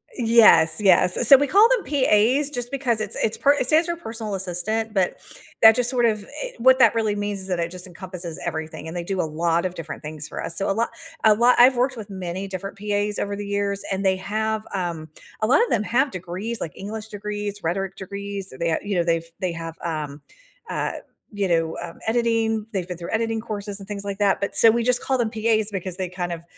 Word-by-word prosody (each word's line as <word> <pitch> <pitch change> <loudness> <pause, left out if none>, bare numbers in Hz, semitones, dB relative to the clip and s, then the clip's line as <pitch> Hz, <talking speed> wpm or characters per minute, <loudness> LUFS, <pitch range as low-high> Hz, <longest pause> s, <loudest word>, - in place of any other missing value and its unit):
Yes, 225 -9 +5
yes. 195 +2 +3
So 275 - +10
we 285 +1 +1
call 410 +9 +6
them - - +1
PAs, 270 +1 +2
just 245 -3 -3
because 250 -5 -1
it's 215 - -4
it's 220 - +1
per 285 +1 +4
It 270 -3 -1
says 320 +4 +4
your 340 -1 -2
personal 225 -8 -5
assistant, 195 +4 -2
but 190 -3 0 0.5
that 220 0 +9
just 245 0 +1
sort 245 -2 +2
of 215 -2 +1 0.2
i - - -5
What 260 +2 +6
that 230 -3 +6
really 220 -2 0
means 205 -1 -3
is 190 - -4
that 180 -2 -1
it 170 0 -2
just 180 0 -5
encompasses 175 -2 -7
everything, 160 -1 -5
and 160 - -7
they 175 - -3
do 190 +1 -3
a - - +2
lot 165 +2 0
of 185 - -2
different 165 -3 -8
things 150 0 -5
for - - -6
us, 165 - -4
so 195 - 0
a - - +2
lo 230 +3 +1 0.4
a 215 -1 +7
lo 240 +3 +4
I've 255 +2 +7
worked 250 +1 +1
with 210 -2 -8
many 190 0 -5
different 195 +1 -6
PAs 205 0 -1
over 200 0 -2
the 205 - -6
years, 200 0 -1
and 195 +1 -2
they 190 0 +3
have, 215 +2 -2
um 170 -4 -4 0.3
A 215 - +2
lot 280 - +5
of 475 - -2
them 220 - +2
have 265 +6 +1
degrees 185 +6 -5
like 160 - -4
English 215 +2 -6
degrees, 205 -1 -5
rhetoric 190 +3 -2
degrees, 200 0 -6
and 130 - -12
they, 170 0 +1
uh 160 - +2
You 205 -2 -2
know, 175 - +3
they've 165 -1 0 0.2
they 185 -2 0
have, 165 -1 -6
um, 150 -3 -4 0.5
uh, - - -2 0.4
you 200 -1 0
know, 165 -2 +1
um, 170 -1 -8
editing, 225 -1 0
they've 190 -5 -3
been 180 -2 -6
through 170 0 -7
editing 225 0 -1
courses, 205 -2 -5
and 195 - -11
things 205 -1 -5
like 200 0 -4
that, 200 -2 +2
but 200 - -3
So, 225 - +7
we 235 +1 +2
just 250 +1 +2
call 265 - 0
them 230 -3 -1
PAs, 220 -1 +1
because 185 -2 -4
they 185 -1 -2
kind 180 0 -4
of 170 -1 -6
205 Hz, 240 wpm, -23 LUFS, 180-225 Hz, 0.5 s, So